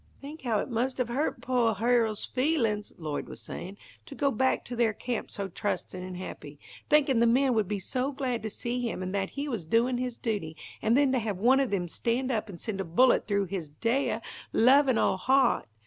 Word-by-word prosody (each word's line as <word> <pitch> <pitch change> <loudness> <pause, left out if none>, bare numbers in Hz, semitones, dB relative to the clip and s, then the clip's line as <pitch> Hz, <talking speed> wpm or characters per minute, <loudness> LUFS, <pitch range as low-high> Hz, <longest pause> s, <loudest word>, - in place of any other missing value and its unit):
"Think 295 +3 -9
how 235 -5 0
it - - -1
must 250 +2 -1
have 250 -2 -1
hurt 275 +6 -1
poah 240 -3 +1
Hero's 225 0 +1
feelin's," 245 -7 0
Lloyd 155 -3 -4
was - - -8
saying, 190 +3 -7 0.3
"to 285 - -9
go 280 0 +1
back 260 +3 +1
to 245 - -6
their 230 -2 +2
camp 240 +1 -4
so 200 -1 -4
trustin' 185 0 -3
and 185 0 -6
happy, 150 -5 -8 0.3
thinkin' 280 -5 +4
the 235 - +5
men 255 +2 +3
would 215 -4 +1
be 210 - -1
so 255 +8 -2
glad 260 -4 -2
to 220 - -4
see 240 +3 -3
him, 230 -6 -3
and 185 +1 -4
that 195 -1 -1
he 285 +1 -2
was 230 - -3
doin' 235 +8 +2
his 250 -2 -3
duty, 195 -9 -3 0.2
and 225 +3 +3
then 280 -2 +4
to 260 - +2
have 210 -4 -3
one 250 +7 +4
of 270 -3 +1
them 185 -3 -1
stand 240 +8 -1
up 220 -2 -2
and 175 -4 -9
send 205 -4 -3
a - - -1
bullet 215 +10 +3
through 200 -1 +1
his 180 -5 -5
deah, 230 - -1 0.3
lovin' 260 +1 +5
old 190 - +2
heart. 260 - +3
230 Hz, 220 wpm, -28 LUFS, 200-255 Hz, 0.3 s, the